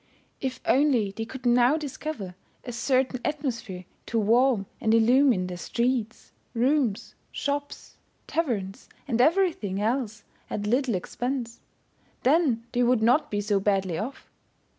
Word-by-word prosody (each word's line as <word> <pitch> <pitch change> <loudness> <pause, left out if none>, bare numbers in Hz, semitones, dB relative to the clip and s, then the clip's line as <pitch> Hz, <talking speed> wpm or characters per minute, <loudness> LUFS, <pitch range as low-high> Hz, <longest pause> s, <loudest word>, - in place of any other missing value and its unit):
If 260 -1 -3
only 255 -7 +3
they 225 +3 -5
could 260 +2 -10
now 245 +4 +4
discover 290 - -5 0.3
a 245 - -6
certain 255 +1 0
atmosphere 235 -11 -3 0.2
to 230 - -1
warm 230 0 +3 0.2
and 220 0 +3
illumine 240 -3 +4
their 180 -1 -6
streets, 235 +3 -2 0.2
rooms, 250 -3 +1 0.2
shops, 285 0 -4 0.3
taverns, 220 - -3 0.2
and 240 -3 +1
everything 310 - +2
else 220 -1 -1 0.3
at 205 - -3
little 245 +1 +1
expense, 245 +5 -4 0.6
then 265 -5 +2
they 245 - 0
would 245 -2 +3
not 295 +6 +3
be 205 -1 -1
so 205 -1 +1
badly 190 -4 0
off. 235 +7 -7
240 Hz, 130 wpm, -26 LUFS, 210-270 Hz, 0.6 s, now